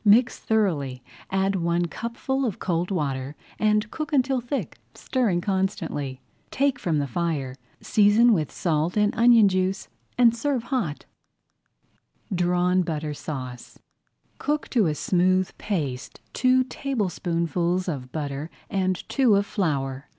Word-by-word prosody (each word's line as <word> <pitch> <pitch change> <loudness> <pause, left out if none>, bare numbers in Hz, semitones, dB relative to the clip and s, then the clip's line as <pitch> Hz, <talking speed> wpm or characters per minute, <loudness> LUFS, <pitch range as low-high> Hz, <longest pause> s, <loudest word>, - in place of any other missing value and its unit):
Mix 230 +3 +4
thoroughly, 150 - 0 0.3
add 195 +1 +1
one 170 -1 +1
cupful 235 - -3
of 230 -7 -1
cold 175 -1 -1
water, 140 -6 -2 0.2
and 210 0 +2
cook 310 -2 -4
until 265 -2 +2
thick, 245 +4 -4 0.2
stirring 220 -10 0
constantly. 170 -9 -2 0.3
Take 270 -2 +1
from 170 -8 0
the 145 - 0
fire, 140 -2 -2 0.3
season 220 +3 +5
with 155 -7 0
salt 165 +2 0
and 210 0 +3
onion 230 -2 +6
juice, 185 0 -1 0.3
and 235 -2 +5
serve 260 0 -1
hot. 235 - -2 1.3
DRAWN 180 +1 +2
BUTTER 155 -3 -3
SAUCE 130 -4 -7 0.6
Cook 295 +1 -1
to 225 -8 +3
a 150 - 0
smooth 185 +3 +1
paste 145 -11 -3
two 255 0 +3
tablespoonfuls 180 - -1
of 130 -7 -4
butter 145 0 -4 0.2
and 185 -2 -1
two 255 -7 +3
of 200 0 +2
flour. 140 -9 -2
185 Hz, 130 wpm, -25 LUFS, 155-230 Hz, 1.3 s, onion